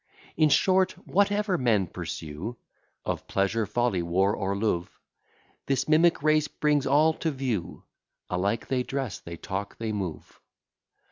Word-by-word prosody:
In 155 -1 +4
short, 185 +6 +3
whatever 200 -1 +2
men 110 -6 +3
pursue, 80 +7 -6 0.5
Of - - -3
pleasure, 100 +3 0
folly, 105 -3 +1
war, 95 +4 +2
or 100 -1 -1
love: 100 -4 -2 0.7
This 135 0 0
mimic 160 0 +4
race 155 -1 +3
brings 150 -2 +1
all 150 +4 +4
to 165 - 0
view: 125 - -3 0.4
Alike 100 +5 -1
they 130 -1 0
dress, 135 -3 -3
they 85 0 -8
talk, 100 +3 -5
they 110 -1 -3
move. 95 -7 -5
120 Hz, 135 wpm, -27 LUFS, 95-150 Hz, 0.7 s, In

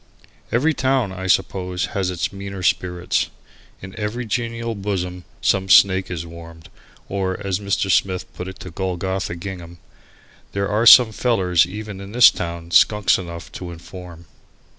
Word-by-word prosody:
Every 145 +7 +2
town, 130 -7 0
I 95 0 -6
suppose, 90 0 0
has 95 -2 -1
its 90 +1 -3
meaner 100 -1 -7
spirits. 90 0 0 0.5
In 95 +1 -9
every 110 +4 -3
genial 115 +1 -3
bosom 90 -3 -4 0.2
some 95 0 +1
snake 95 0 +5
is 85 -2 -5
warmed, 85 -1 -12 0.4
or, 95 -1 -2
as 95 -1 -1
Mr. 100 -1 -1
Smith 95 0 +1
put 90 - -7
it 95 0 -9
to 90 - -8
Golgotha 95 0 -3
Gingham 85 -1 -8 0.8
"there 100 0 -1
are 105 +3 +1
some 120 -1 +9
fellers 95 -7 +2
even 105 +1 -7
in 100 +2 -10
this 120 -1 +8
town 85 -1 -6
skunks 105 0 +4
enough 85 -2 -8
to 90 - -7
inform." 85 0 -11
95 Hz, 150 wpm, -21 LUFS, 90-100 Hz, 0.8 s, some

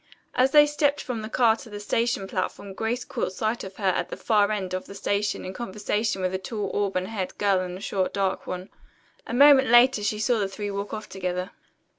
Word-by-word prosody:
As 255 +1 +3
they 295 +1 +7
stepped 290 -1 +1
from 245 -5 -4
the 215 - -6
car 230 -2 +4
to 230 - -12
the 205 -1 -7
station 215 -1 0
platform 195 +1 -4
Grace 225 +5 -2
caught 185 - -3
sight 220 +4 -2
of 190 0 -8
her 210 - -10
at 185 - +1
the - - -6
far 210 -2 +2
end 190 -3 -3
of 185 - -4
the 200 - -10
station 205 +1 -1
in 185 - -5
conversation 210 -1 -2
with 185 0 0
a 190 - -1
tall 205 0 -4
auburn 195 -2 0
haired 190 -2 -5
girl 200 -2 +2
and 180 0 -4
a - - -12
short 190 -3 -1
dark 195 -1 -1
one. 185 +1 -5 0.6
A - - -5
moment 275 0 +7
later 240 -1 +6
she 210 +1 0
saw 225 +2 +1
the 200 - 0
three 205 +1 -5
walk 200 +1 -4
off 215 -1 -6
together. 180 -1 -3
205 Hz, 225 wpm, -25 LUFS, 190-230 Hz, 0.6 s, they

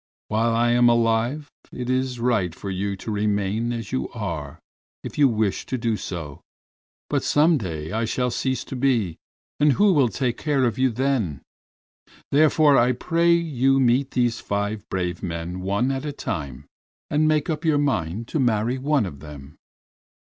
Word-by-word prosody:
While 115 +2 +1
I 120 +1 +2
am 120 0 +5
alive 120 +5 +1 0.2
it 125 -1 -5
is 130 -1 -1
right 110 -8 0
for 100 - -6
you 100 +1 -2
to 105 +3 -6
remain 105 +2 0
as 115 -3 -5
you 130 - -2
are 85 -10 -5 0.5
if - - -7
you 140 -2 +6
wish 110 -4 -1
to 130 - -2
do 115 -2 0
so, 80 -8 -6 0.7
but - - -1
some 155 +1 +3
day 80 -6 -5
I 115 +3 0
shall 125 +2 -1
cease 130 +2 -1
to - - -7
be 120 -10 0 0.4
and 145 -1 +4
who 200 +3 +4
will 140 -7 +3
take 120 +3 -2
care 145 -4 +1
of 120 -1 -1
you 130 0 +3
then? 115 - -1 0.9
Therefore 150 0 +5
I 125 +2 +3
pray 170 +6 +1
you 135 -6 +1
to - - +3
meet 130 +3 +2
these 120 -3 0
five 100 +1 -2
brave 90 -2 -2
men 85 +1 -4
one 100 +8 0
at 135 0 -3
a 150 - -3
time 70 - -5 0.5
and 155 +1 +3
make 155 -1 +2
up 160 0 -2
your 155 -3 +3
mind 115 - -1
to 155 - -1
marry 120 0 +1
one 140 -3 +1
of 70 -7 -8
them!" 75 -1 -11
120 Hz, 175 wpm, -23 LUFS, 100-135 Hz, 0.9 s, you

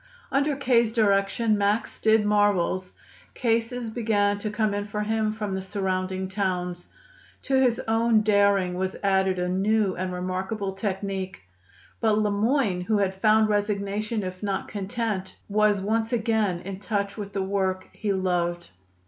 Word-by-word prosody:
Under 280 +1 +2
K.'s 240 -4 +2
direction, 215 0 +2
Max 205 +3 0
did 220 -1 +4
marvels. 200 -3 +1 0.4
Cases 230 0 -1
began 205 -3 +1
to 215 - -3
come 210 -1 0
in 205 0 -3
to 210 0 -3
him 220 0 0
from 210 -2 -4
the 190 - -2
surrounding 190 -1 -2
towns. 180 -3 -2 0.6
To 265 -1 +2
his 245 -3 +3
own 225 0 +3
daring 200 -3 +3
was 185 +1 -2
added 190 -1 +2
a 180 0 -1
new 195 +2 +1
and 185 +1 -3
remarkable 190 +3 -3
technique. 195 - -4 0.6
But 220 -2 +2
Le 210 -1 +1
Moyne, 210 -2 +1
who 215 +4 +1
had 190 -1 -1
found 215 0 +5
resignation 210 +1 -1
if 185 0 -6
not 200 -2 -2
content, 200 -1 -3
was 210 0 +3
once 220 +3 -1
again 220 -6 +1
in 190 +1 -7
touch 200 0 -2
with 200 -2 -7
the 195 - -1
work 190 -1 -1
he 210 -2 -2
loved. 175 -2 -1
205 Hz, 150 wpm, -25 LUFS, 190-220 Hz, 0.6 s, found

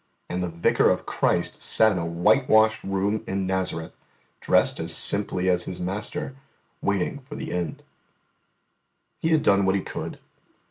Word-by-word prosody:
And 90 +1 -3
the 90 - -2
Vicar 85 0 +2
of - - -1
Christ - - -1
sat 110 0 +5
in 95 - -2
a 85 - -3
whitewashed 110 +5 +3
room 100 +2 -1
in 95 0 -2
Nazareth, 95 -3 -3 0.5
dressed - - +2
as - - 0
simply 100 -2 +2
as 90 -1 +2
His 90 - -5
master, 105 +10 -3 0.5
waiting 100 +7 -1
for 145 - -7
the - - -6
end. 85 -3 -4 1.4
He 160 - -1
had 160 -2 +2
done 100 0 +3
what 95 0 +2
He 100 - 0
could. - - -6
95 Hz, 155 wpm, -24 LUFS, 90-110 Hz, 1.4 s, sat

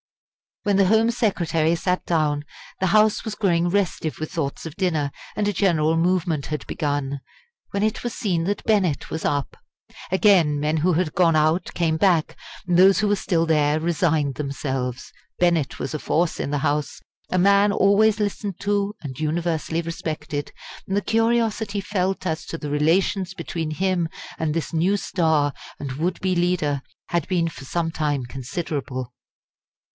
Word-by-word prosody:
When 205 -2 +2
the 195 - +5
Home 220 +3 +4
Secretary 170 -8 +1
sat 180 +2 -1
down, 150 -3 +1 0.4
the 190 - +1
House 215 +3 +4
was 220 -2 -4
growing 175 -4 +2
restive 175 -6 -1
with 155 - -4
thoughts 145 -2 -3
of 160 - -7
dinner, 160 -7 0 0.2
and 210 -1 0
a 205 - +1
general 165 -5 +2
movement 165 -3 +1
had 150 -1 -4
begun 145 -2 -2 0.5
when 200 - -1
it 215 0 -1
was 240 - -3
seen 180 -7 -1
that 205 +2 -2
Bennett 195 -9 +1
was 160 - -3
up. 145 -1 -1 0.5
Again 185 -7 +4
men 150 +2 0
who 175 +4 +2
had 160 -1 0
gone 170 -3 +3
out 155 +3 +2
came 160 -2 +1
back, 170 -3 +2 0.3
and 175 -1 +2
those 190 +2 +6
who 215 - +2
were 205 - +3
still 170 -4 0
there 150 -1 +3
resigned 160 -4 +1
themselves. 135 -3 -3 0.3
Bennett 170 -5 +2
was 135 - -4
a - - -2
force 165 +3 0
in - - -2
the 145 - 0
House, 145 0 -1 0.3
a 185 - +1
man 200 +2 +5
always 205 +2 +4
listened 205 -2 -2
to 205 0 0
and 130 -4 -7
universally 160 +1 -1
respected, 155 -3 -4 0.4
and 195 - 0
the - - +2
curiosity 225 -2 +1
felt 190 -1 -1
as 160 -2 -2
to 165 - -5
the 150 - -5
relations 180 +5 +1
between 165 -3 -4
him 175 0 0 0.3
and 160 -2 0
this 165 +1 -3
new 180 +5 +2
star 160 -7 +1 0.3
and 140 -2 -4
would 170 +6 -2
be 185 -1 +1
leader 175 -5 +1 0.3
had 170 -3 0
been 175 -3 +1
for 150 -4 -8
some 165 +4 -1
time 145 -5 -1
considerable. 130 -1 -4
170 Hz, 170 wpm, -23 LUFS, 150-195 Hz, 0.5 s, those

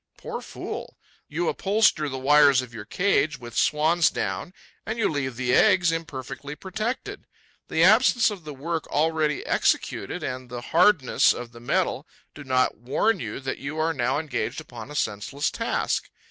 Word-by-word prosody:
Poor - - -6
fool! - - -7 0.3
You 170 +3 -2
upholster 195 -7 +2
the 135 - -4
wires 140 -1 +5
of 120 -2 -12
your 110 -2 -8
cage 155 - +1
with 120 -1 -10
swan's 160 +3 +3
down - - -3 0.3
and 220 +2 -4
you 225 - +2
leave 135 -4 -2
the 125 0 0
eggs 175 +4 +5
imperfectly 150 -3 -6
protected. 215 +9 -5 0.4
The 160 - +2
absence 225 +4 +5
of 195 -5 -8
the 150 -1 -7
work 160 +4 -3
already 155 -1 0
executed - - 0
and 130 -1 -5
the 120 0 -6
hardness 170 -1 +4
of 120 -1 -8
the 120 - -13
metal 120 - -1 0.3
do 145 - -10
not 130 -1 +1
warn 140 - 0
you 110 -1 -5
that 130 0 -4
you 140 +3 -5
are 160 +1 +1
now 125 -3 0
engaged 150 -4 -3
upon 120 +1 -10
a 150 - -9
senseless 110 +4 -1
task. 230 - -1
150 Hz, 165 wpm, -25 LUFS, 130-170 Hz, 0.4 s, wires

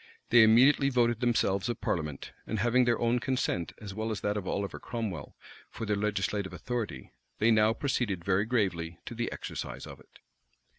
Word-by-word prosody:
They 120 0 +8
immediately 130 +6 +6
voted 120 -3 +2
themselves 115 -5 +1
a 120 - 0
parliament; 75 -5 -3 0.2
and 110 - -2
having 120 +4 +3
their 120 -1 +2
own 120 +1 +1
consent, 125 -9 -1
as 100 -2 -7
well 110 +2 -3
as 110 - -3
that 105 0 0
of 100 -3 -4
Oliver 100 -1 -2
Cromwell, 110 - -5 0.3
for 115 - -6
their 105 -1 +1
legislative 100 -1 -1
authority, 120 -3 -4 0.3
they 110 +2 +3
now 110 0 +5
proceeded 115 -10 -1
very 100 +1 +2
gravely 90 -9 -1
to - - -6
the - - -3
exercise - - -6
of - - -10
it. - - -20
110 Hz, 180 wpm, -30 LUFS, 100-120 Hz, 0.3 s, They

